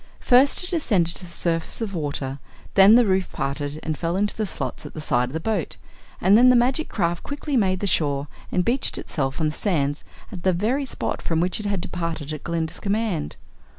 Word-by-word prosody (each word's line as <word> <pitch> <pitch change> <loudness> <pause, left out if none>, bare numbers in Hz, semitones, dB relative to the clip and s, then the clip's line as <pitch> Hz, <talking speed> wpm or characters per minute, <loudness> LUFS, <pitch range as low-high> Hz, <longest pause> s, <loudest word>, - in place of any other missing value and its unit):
First 260 +7 +4
it 360 - -4
ascended 190 - +2
to 185 - -5
the - - -14
surface 165 -1 -1
of 225 -3 -3
the 185 - -4
water, 140 -2 -3 0.3
then 195 +3 +8
the 245 0 +6
roof 190 -2 +1
parted 145 +1 -3
and 155 -1 -2
fell 170 +3 -2
into 205 +1 0
the 215 -2 -2
slots - - -5
at - - -10
the - - -5
side 125 -5 +1
of - - -11
the 160 - -2
boat, 205 -1 -2 0.4
and 190 +3 +5
then 245 +3 +7
the 250 - +6
magic 260 +6 +2
craft 170 -3 -1
quickly 285 0 -4
made 190 -5 +2
the - - 0
shore 145 -6 +1 0.3
and 180 -1 +1
beached 250 +3 +1
itself 135 -1 -3
on 155 -2 +1
the - - -5
sands 145 -7 -1 0.3
at 185 -5 -7
the 185 +1 +2
very 235 +11 0
spot - - -3
from 165 -1 -1
which 180 +4 0
it 210 - -4
had 200 -3 -1
departed 165 -4 -4
at 150 - -7
Glinda's 165 -1 -3
command. 205 -6 -1
180 Hz, 220 wpm, -23 LUFS, 155-215 Hz, 0.4 s, then